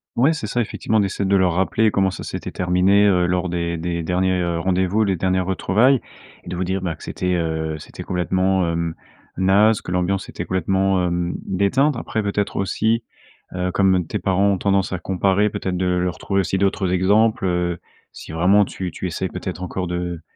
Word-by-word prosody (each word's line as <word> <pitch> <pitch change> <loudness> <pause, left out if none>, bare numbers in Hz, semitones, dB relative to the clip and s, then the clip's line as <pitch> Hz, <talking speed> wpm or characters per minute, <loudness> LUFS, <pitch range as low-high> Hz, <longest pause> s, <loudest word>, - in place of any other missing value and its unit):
Ouais, 135 +6 +4
c'est 150 -9 -3
ça 120 +3 0
effectivement, 110 -1 0
d'essayer 100 0 -1
de 100 - +3
leur 95 -2 +3
rappeler 105 +4 +2
comment 95 -1 +2
ça 95 - -7
s'était - - -5
terminé, 90 +3 +3
heu, 90 -3 +3
lors 90 +1 0
des 85 -1 -2
des 85 +1 -3
derniers, 90 +2 0
heu, 85 -1 -1
rendez-vous, 95 +4 +1
les 95 -3 0
dernières 95 +1 0
retrouvailles 110 +8 +3 0.5
et - - -14
de - - -4
vous 90 - -1
dire, 95 +1 -2
bah, 85 -3 -2
que - - -15
c'était, 90 0 -2
heu, 80 -2 -2
c'était - - -9
complètement, 95 +1 0
heu, 85 0 -1 0.4
naze, 100 +4 +3
que - - -7
l'ambiance 90 +2 -1
était - - -5
complètement, 95 +1 +1
hem, 85 0 -1
déteinte. 125 +9 +1
Après 110 -2 -3
peut-être 100 0 -1
aussi, 110 +4 0 0.5
heu, 90 0 -2
comme 95 -3 +2
tes - - -2
parents 100 +1 +2
ont - - -1
tendance 95 0 +1
à 90 - -2
comparer, 95 +3 +1
peut-être 95 -2 -3
de 95 +1 -1
leur 90 0 0
trouver 100 -1 -1
aussi 95 0 0
d'autres 95 -1 0
exemples, 105 +5 +3
heu, 90 -1 0 0.3
si - - -10
vraiment 90 +6 +4
tu 95 -2 -5
tu 90 - -4
essaies 90 +2 -3
peut-être 90 0 -6
encore 90 0 -3
de 85 -1 -4
95 Hz, 200 wpm, -21 LUFS, 90-100 Hz, 0.5 s, Ouais